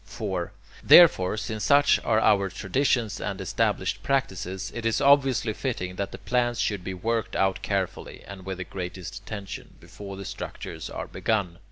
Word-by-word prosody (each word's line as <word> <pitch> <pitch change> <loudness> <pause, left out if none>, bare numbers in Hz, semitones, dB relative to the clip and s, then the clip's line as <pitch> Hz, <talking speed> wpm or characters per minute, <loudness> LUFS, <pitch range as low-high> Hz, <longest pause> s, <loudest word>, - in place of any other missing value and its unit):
4. 95 -5 -4 0.3
Therefore, 110 - +7
since 110 0 -4
such 145 0 +5
are 110 -1 +2
our 100 -3 +3
traditions 115 +2 0
and 100 - -3
established 95 - -1
practices, 95 -8 -2
it 115 - -5
is 115 -1 +1
obviously 135 -5 +4
fitting 100 -7 -3
that 100 - -3
the - - -7
plans 120 -1 0
should 100 -4 -1
be 95 0 -4
worked 115 +4 -2
out 95 -1 +1
carefully, 95 -3 -3
and 100 -1 -10
with 95 0 -5
the 95 - -4
greatest 90 -1 -6
attention, 100 -3 -8
before 100 -1 -10
the 100 - -7
structures 80 -2 -7
are - - -5
begun. 95 -6 -2
100 Hz, 165 wpm, -26 LUFS, 95-115 Hz, 0.3 s, Therefore